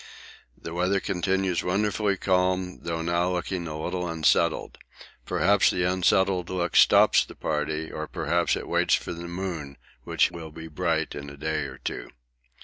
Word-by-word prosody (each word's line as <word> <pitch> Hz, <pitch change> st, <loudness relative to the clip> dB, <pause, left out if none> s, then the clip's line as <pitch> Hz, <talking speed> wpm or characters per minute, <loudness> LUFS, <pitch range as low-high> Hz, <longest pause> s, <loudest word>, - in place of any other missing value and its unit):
The 80 Hz, -, -7 dB
weather 90 Hz, +3 st, +1 dB
continues 95 Hz, -1 st, 0 dB
wonderfully 100 Hz, +1 st, 0 dB
calm 90 Hz, 0 st, 0 dB
though 80 Hz, -1 st, -3 dB
now 85 Hz, +2 st, +1 dB
looking 90 Hz, 0 st, -3 dB
a 75 Hz, 0 st, -5 dB
little 90 Hz, +2 st, -3 dB
unsettled. 80 Hz, 0 st, +1 dB, 0.5 s
Perhaps 100 Hz, +2 st, +3 dB
the 90 Hz, -, 0 dB
unsettled 95 Hz, 0 st, +2 dB
look 90 Hz, -2 st, -2 dB
stops -, -, +6 dB
the -, -, -12 dB
party, 75 Hz, +1 st, -2 dB
or 80 Hz, 0 st, -5 dB
perhaps 85 Hz, +2 st, 0 dB
it -, -, -6 dB
waits -, -, +3 dB
for -, -, -4 dB
the 85 Hz, +1 st, -7 dB
moon, 85 Hz, -6 st, -5 dB, 0.3 s
which -, -, +2 dB
will 85 Hz, -2 st, -8 dB
be 80 Hz, +1 st, -9 dB
bright 75 Hz, -, -1 dB
in 70 Hz, 0 st, -7 dB
a 70 Hz, -, -11 dB
day 80 Hz, 0 st, -2 dB
or 65 Hz, -1 st, -8 dB
two. -, -, -5 dB
85 Hz, 160 wpm, -26 LUFS, 80-95 Hz, 0.5 s, stops